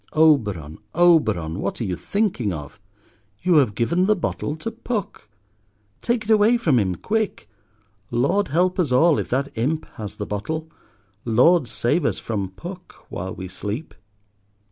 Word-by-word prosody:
Oberon, 105 - +2 0.2
Oberon, 110 - +3
what 100 - -3
are - - -1
you 95 -4 -2
thinking 185 - -1
of? 75 -1 -7 0.6
You 180 -2 +4
have 125 -9 +3
given 170 - +1
the 215 - +4
bottle 160 -4 -3
to 225 +8 -5
Puck. 220 - -5 0.7
Take 235 -1 0
it 215 - -1
away 220 +3 +5
from 155 - +2
him, 95 -4 0
quick. 215 - -2 0.6
Lord 140 +13 +1
help 180 +6 +1
us 160 -8 +1
all 155 +5 +4
if - - -4
that 135 +3 -1
Imp 145 +8 -1
has 105 -2 -6
the 105 - -4
bottle. 155 +12 -4 0.6
Lord 125 +6 +4
save 120 +8 0
us - - 0
from 100 -4 -3
Puck 175 - -10 0.2
while 95 +2 -5
we 95 - -6
sleep. 105 - -5
140 Hz, 155 wpm, -23 LUFS, -, 0.7 s, away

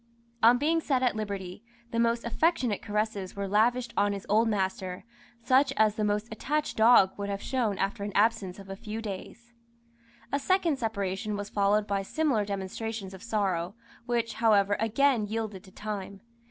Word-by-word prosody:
On 235 +2 +7
being 320 +5 +1
set 265 -4 0
at 245 -3 +2
liberty, 200 -2 -5 0.3
the 230 - -1
most 235 0 +2
affectionate 245 - +1
caresses 210 -3 -2
were 200 0 -3
lavished 235 +5 +2
on 205 0 +2
his 200 - -6
old 220 +3 +3
master, 190 -3 -2 0.4
such 260 +3 +4
as 215 -1 +4
the 215 - -2
most 210 +1 0
attached 295 +7 -2
dog 220 -4 +6
would 200 0 -3
have 200 0 -2
shown 230 -6 -1
after 200 +3 -2
an 205 - -3
absence 200 -3 +2
of 195 -1 -11
a 195 - -6
few 215 +1 -6
days. 225 +3 -8 0.8
A 280 - +1
second 335 -3 +1
separation 205 -2 -2
was 205 0 -5
followed 205 +1 +2
by 200 -1 -1
similar 250 -1 0
demonstrations 200 +1 -5
of 190 - -10
sorrow, 200 -5 -1 0.3
which, 235 -1 0
however, 205 -3 +3
again 225 0 +2
yielded 215 -3 -4
to 190 - -15
time. 200 -1 -6
215 Hz, 170 wpm, -28 LUFS, 200-235 Hz, 0.8 s, On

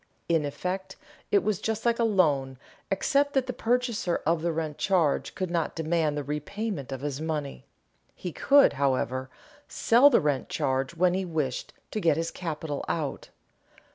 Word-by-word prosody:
In 165 -3 +2
effect 185 +6 -4 0.3
it 200 - +3
was 210 -3 -1
just 220 0 -2
like 235 0 +2
a - - +3
loan 145 - +2 0.3
except 280 +9 +1
that 270 -2 +2
the 255 - -4
purchaser 235 -6 0
of 165 +1 +2
the 170 +1 0
rent 155 -2 -3
charge 175 -7 +1
could 185 -3 -3
not 170 -2 -1
demand 160 -2 0
the 145 - -2
repayment 150 - -4
of 135 -1 -5
his 145 0 -3
money. 150 - -4 0.5
He 180 - -5
could, 280 - +5
however, 130 -1 0 0.4
sell 245 +5 +5
the 265 - +5
rent 145 -6 -1
charge 135 +4 -1
when 180 +1 +3
he 190 +1 0
wished 155 -7 -2 0.2
to 215 - -2
get 165 -4 +3
his 165 0 -2
capital 155 -4 -4
out. 150 -4 -3
165 Hz, 170 wpm, -27 LUFS, 145-200 Hz, 0.5 s, could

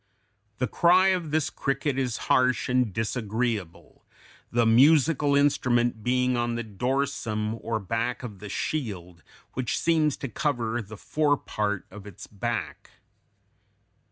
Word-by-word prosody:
The 125 - 0
cry 180 +7 +4
of 180 -4 0
this 155 0 0
cricket 135 0 -1
is 125 -3 -1
harsh 125 -2 +2
and 125 -3 +1
disagreeable, 110 - -3 0.5
the 120 0 +2
"musical 145 +4 +4
instrument" 120 -5 +2
being 125 +1 +1
on 120 0 -1
the 120 - -3
dorsum 110 -1 -2
or 115 -1 -2
back 115 +5 -2
of 105 -6 -8
the 105 +1 -8
shield 95 - -4 0.3
which 130 -1 -2
seems 155 -3 +2
to 135 - -5
cover 120 -3 -1
the 110 0 -10
fore 145 +5 +1
part 105 -5 -3
of 105 -1 -11
its 100 +1 -10
back. 100 -3 -4
120 Hz, 130 wpm, -26 LUFS, 110-140 Hz, 0.5 s, cry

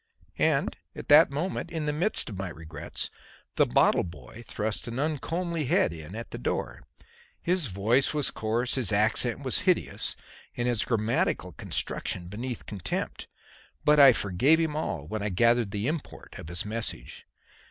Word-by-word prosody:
And - - +2 0.2
at - - -9
that 150 +3 +8
moment, 165 +5 -3
in 160 -3 -3
the 150 - 0
midst 175 - +1
of - - -6
my 95 0 -4
regrets, 80 -3 -6 0.4
the - - +4
bottle - - +3
boy 85 - -10
thrust 110 +1 -3
an 120 +1 -5
uncomely 160 +3 -2
head 85 -10 +2
in 80 +3 -9
at 115 +1 -7
the - - -6
door. - - -3 0.5
His 180 -4 0
voice 110 +7 +2
was 150 -3 +1
coarse, 115 +3 -1
his 130 -4 0
accent 110 +5 +2
was 130 - +3
hideous, 180 - +1 0.4
and 120 0 0
his 120 -3 +1
grammatical 115 -1 0
construction 90 -1 -3
beneath 120 +4 -5
contempt; 95 -5 -4 0.6
but 150 0 +5
I 140 -2 +10
forgave 110 - +3
him 160 -2 0
all 85 - -3
when 105 +7 -4
I 105 - -1
gathered 115 +3 +3
the 100 +1 -3
import 155 +2 -5
of - - -9
his 85 +3 -4
message. 110 - -5
115 Hz, 165 wpm, -28 LUFS, 100-150 Hz, 0.6 s, I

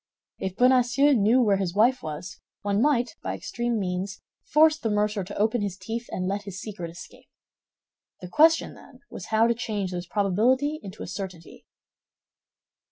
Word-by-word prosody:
If 190 -1 -4
Bonacieux 255 +3 +4
knew 235 +2 +4
where 205 -3 +3
his 185 -2 -3
wife 240 +5 +3
was, 160 +5 -7 0.2
one 205 +1 +1
might, 250 -3 +1
by - - -3
extreme 240 -1 -2
means, 190 0 -3 0.3
force 310 +1 +5
the 225 - -2
mercer 210 -1 0
to 195 +3 -8
open 220 +2 +1
his 200 -2 -3
teeth 225 +5 -5
and 185 0 -3
let 200 +2 -1
his 195 -1 -7
secret 195 -6 -6
escape. 170 - -13 0.9
The 180 - -8
question, 320 - +4
then, 255 0 -17
was 180 - -8
how 220 +1 +3
to 235 - +3
change 210 -5 -3
this 175 -1 -5
probability 240 - +1
into 195 +1 -8
a - - -7
certainty. 185 -3 -8
210 Hz, 165 wpm, -26 LUFS, 190-245 Hz, 0.9 s, force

